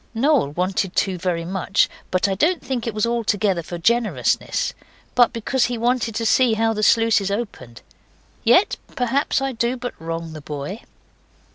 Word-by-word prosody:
Noel 270 - +3
wanted 185 +2 -1
to 185 -3 0
very 170 -2 -1
much; 190 +2 +1 0.2
but 185 +2 +1
I 195 - 0
don't 320 - +1
think 250 -3 -3
it 230 - -2
was 215 - +1
altogether 215 -5 0
for 175 +2 -7
generousness, 230 +6 0 0.4
but 245 -2 +5
because 240 +3 0
he 245 -1 -2
wanted 235 -1 0
to 230 - -1
see 235 0 +4
how 225 0 +1
the 215 - -3
sluices 220 -2 +3
opened. 200 - -5 0.6
Yet 245 - +4 0.2
perhaps 270 +2 0
I 270 - -1
do 240 +1 -1
but 245 0 -5
wrong 165 0 -5
the 155 - -8
boy. 150 +9 -6
225 Hz, 165 wpm, -22 LUFS, 185-240 Hz, 0.6 s, but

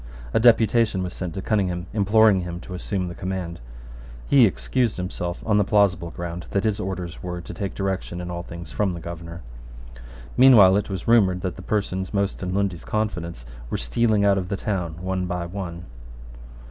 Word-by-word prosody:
A - - +4
deputation 115 -3 +4
was 90 - -5
sent 90 -3 -5
to 95 - -4
Cunningham 90 -5 0
imploring 105 -1 +4
him 85 0 -5
to 90 - -9
assume 90 0 -2
the 85 - -5
command. 90 -2 -4 0.7
He 130 -5 +6
excused 120 +3 -1
himself 90 -1 -4
on 105 -2 +3
the - - +4
plausible 95 -4 +2
ground 85 +1 -6
that 100 - 0
his 110 -2 0
orders 90 -3 -5
were 90 -1 -4
to 85 - -8
take 100 -3 -4
directions 95 -3 -3
in 90 0 -5
all 85 0 -4
things 85 0 -9
from 100 -3 0
the 85 - -6
Governor, 85 0 -8 0.9
Meanwhile 115 -8 +8
it 105 - -2
was 95 -3 -5
rumoured 95 -6 +4
that 90 -2 -3
the 95 - -9
persons 95 -1 -2
most 100 0 0
in 90 -1 -3
Lundy's 95 -3 -1
confidence 85 - -3 0.2
were - - -1
stealing 105 - +1
out 100 -1 +4
of 90 -1 -5
the 100 - -1
town 90 -5 -3
one 95 -1 -1
by 90 -1 -3
one. 85 -2 -6
95 Hz, 185 wpm, -24 LUFS, 85-100 Hz, 0.9 s, Meanwhile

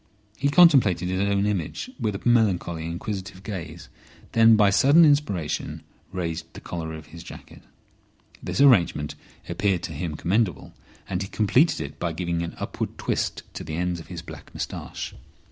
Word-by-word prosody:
He 140 +4 0
contemplated 135 - +5
his 95 0 -1
own 100 0 +1
image 105 - -2
with 105 -3 -1
a - - -6
melancholy 90 -8 +2
and 85 - -4
inquisitive 95 0 -6
gaze, 85 -5 -7 0.4
then 115 0 +6
by 105 -2 +5
sudden 145 +11 +6
inspiration 105 - 0 0.3
raised 85 -3 -4
the - - -9
collar 80 -2 -5
of 80 -1 -10
his 85 - -9
jacket. - - -12 0.8
This - - -2
arrangement 90 - +4 0.3
appeared 95 -4 0
to 80 - -5
him 80 +1 -4
commendable, 90 - 0 0.3
and 90 -1 -2
he 95 - -3
completed 125 - +2
it 75 +1 -7
by 85 -2 -2
giving 85 0 -2
an 85 - -5
upward - - -4
twist - - -2
to - - -6
the 80 0 -5
ends 90 0 -1
of 80 - -11
his 85 -2 -7
black - - -11
moustache. - - -5
95 Hz, 165 wpm, -25 LUFS, 85-110 Hz, 0.8 s, then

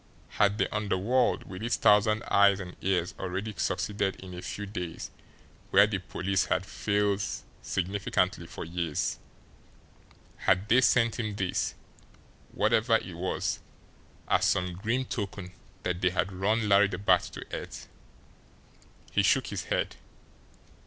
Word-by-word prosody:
Had 100 0 +2
the - - +2
underworld 105 +4 +1
with 95 0 -9
its 120 +1 +1
thousand 105 +1 +4
eyes 100 -1 +4
and 90 -2 -7
ears 90 -2 0
already 95 +3 -3
succeeded 100 +2 -1
in 95 -1 -10
a 90 - -7
few 100 - -5
days 90 -5 -6 0.6
where 100 +2 +7
the 105 -2 -2
police 90 +1 -1
had 95 0 0
failed 100 0 0 0.4
signally 95 +2 -2 0.5
for - - -7
years 85 -2 -2 1.2
had 95 +3 +2
they 125 +3 +6
sent 115 0 +3
him 105 -3 -2
this, 95 -3 -1 0.8
whatever 115 +1 +3
it 95 -4 -8
was, 90 +2 -2 0.7
as - - +3
some 90 -2 +1
grim 115 +8 -1
token 100 -5 -5 0.3
that 90 0 -2
they 95 - +4
had 95 +2 -1
run 105 +4 +1
Larry 100 0 +6
the 95 -2 -4
Bat 95 -2 +4
to - - -7
earth? - - -6 1.2
He - - +3
shook - - +3
his - - -4
head. - - -1
100 Hz, 140 wpm, -29 LUFS, 90-105 Hz, 1.2 s, where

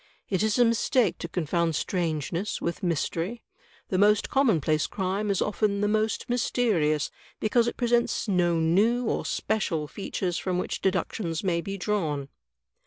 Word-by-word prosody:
It 190 -2 0
is 215 +1 +1
a 245 - +6
mistake 230 -2 +2
to - - -4
confound 170 -1 0
strangeness 170 +3 -2
with 170 - -3
mystery. 175 +5 -2 0.5
The 185 - 0
most 210 +1 +3
commonplace 160 - +2
crime 195 +2 -2
is 195 - +2
often 210 -1 0
the 205 - +2
most 215 +1 0
mysterious 215 - +1 0.3
because 230 +2 +2
it - - -3
presents 240 -1 +1
no 175 -4 +2
new 210 +10 +2
or - - -1
special 165 -8 -1
features 180 -1 -3
from 185 -1 -1
which 180 - -3
deductions 185 -2 -1
may 170 -3 +1
be 195 +2 -5
drawn. 160 -9 -1
190 Hz, 150 wpm, -27 LUFS, 170-215 Hz, 0.5 s, a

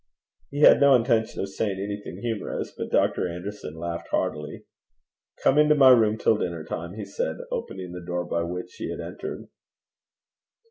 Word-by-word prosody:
He 145 +1 -4
had 150 - +8
no 140 -1 +7
intention 115 -2 +1
of 100 - -3
saying 95 0 -2
anything 100 -2 -6
humorous, 115 -3 -3
but - - -5
Dr. - - +2
Anderson 90 -2 -7
laughed 85 0 -5
heartily. 75 0 -2 0.8
'Come 140 - +4
into 150 0 +5
my 135 -3 +8
room 110 -3 +5
till 110 -1 +2
dinner 85 -3 -3
time,' 85 +3 -6
he 105 -2 -5
said, 90 -5 -3
opening 95 -2 -5
the 90 0 -7
door 90 0 -3
by 85 -1 -1
which 90 +2 -5
he - - -4
had - - -5
entered. - - -6
100 Hz, 170 wpm, -25 LUFS, 85-110 Hz, 0.8 s, had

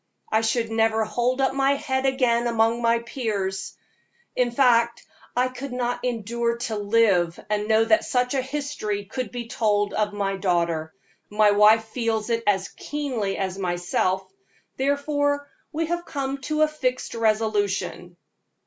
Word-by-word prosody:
I 220 - +3
should 225 0 0
never 225 0 +2
hold 245 +4 0
up 265 - +2
my 275 0 +3
head 265 -1 -1
again 245 -3 +2
among 230 0 +2
my 230 0 +3
peers; 210 -5 -3 0.6
in 250 -1 +2
fact, 235 -2 +3 0.3
I 250 +1 +3
could 255 +2 -7
not 245 -1 -2
endure 235 0 -1
to 235 -2 -3
live 200 -5 +2
and 210 -1 +1
to 210 - -5
know 220 0 +4
that 220 0 +4
such 250 0 0
a 270 - +1
history 260 -7 -3
could 245 +2 -5
be 240 -1 -5
told 205 -3 +1
of 210 -1 0
my 200 -1 -2
daughter. 170 -4 0 0.4
My 210 0 +4
wife 210 +2 +6
feels 225 -1 -2
it 230 0 +1
as 195 -2 +2
keenly 255 -10 -3
as 190 0 -3
myself, 185 +1 -1 0.5
therefore 285 +1 0 0.2
we 325 +2 -1
have 345 +1 -2
come 275 -3 -3
to 305 0 +3
a - - +4
fixed 260 -5 -2
resolution." 210 -5 -1
230 Hz, 155 wpm, -24 LUFS, 205-255 Hz, 0.6 s, wife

